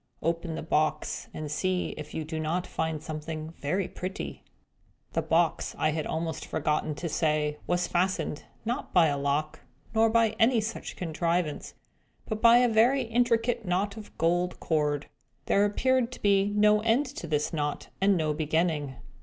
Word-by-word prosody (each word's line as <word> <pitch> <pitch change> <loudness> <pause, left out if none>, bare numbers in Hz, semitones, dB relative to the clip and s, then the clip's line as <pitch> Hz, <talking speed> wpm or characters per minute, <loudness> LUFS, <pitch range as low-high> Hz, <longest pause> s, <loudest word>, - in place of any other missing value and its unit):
Open 165 0 -1
the - - -5
box, 155 -1 0
and 155 -1 -6
see 185 +3 0
if 150 -1 -8
you 160 - -3
do 160 0 -4
not 165 +3 -1
find 160 -2 -3
something 155 0 -5
very 180 +6 -1
pretty!" 190 +2 -6 0.7
The - - +1
box, - - +1
I 155 - +2
had 155 0 -2
almost 160 0 -3
forgotten 150 0 -1
to 170 - -4
say, 150 -2 0
was 175 0 +1
fastened; 175 -4 -1 0.2
not 240 +5 -3
by 175 - +7
a 145 -2 +1
lock, 145 +2 -1 0.3
nor 225 0 +4
by 230 0 +4
any 230 +3 +5
other 225 - +3
such 220 +2 -5
contrivance, 170 -1 -2 0.5
but 220 -1 -3
by 235 0 +8
a 245 0 +5
very 240 +4 +4
intricate 230 0 +1
knot 195 +2 0
of 220 -2 -11
gold 175 +2 +1
cord. 150 -2 0 0.4
There 200 +1 +3
appeared 250 +4 +1
to - - -9
be 200 -1 +3
no 210 0 +4
end 230 +6 +3
to 260 -10 -7
this 150 0 0
knot, 150 -2 -2
and 195 -1 +4
no 155 -2 0
beginning. 155 -2 0
175 Hz, 170 wpm, -28 LUFS, 155-210 Hz, 0.7 s, by